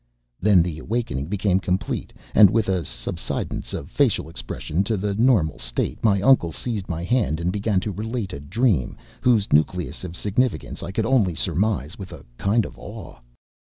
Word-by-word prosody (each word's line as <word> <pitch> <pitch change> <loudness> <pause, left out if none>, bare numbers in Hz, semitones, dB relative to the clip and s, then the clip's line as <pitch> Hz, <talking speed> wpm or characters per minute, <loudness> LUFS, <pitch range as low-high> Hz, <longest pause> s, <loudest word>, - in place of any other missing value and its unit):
Then 95 -3 +5
the 80 -3 -4
awakening 100 - -2
became 95 0 +1
complete, 90 -1 -2 0.2
and 105 -2 +8
with 110 +1 +1
a 90 -3 +1
subsidence - - -4
of 70 - -6
facial 125 - +1
expression 85 +1 -3
to 110 0 0
the 100 +1 -1
normal 105 - +3
state - - -3
my 100 -3 +3
uncle 105 -10 +5
seized 105 +2 -4
my 85 0 -3
hand 105 -7 +1
and 85 +1 0
began 100 0 +1
to 105 - -3
relate 105 0 -4
a - - -5
dream 90 - 0 0.2
whose 115 -5 +3
nucleus 90 +5 +1
of 90 -1 -6
significance 110 +3 -1
I - - -5
could 110 +3 -1
only 110 -9 +2
surmise 95 -4 0
with 95 -2 -8
a 75 -4 -11
kind 105 +3 +2
of - - -10
awe. - - -9
95 Hz, 175 wpm, -23 LUFS, 85-110 Hz, 0.2 s, and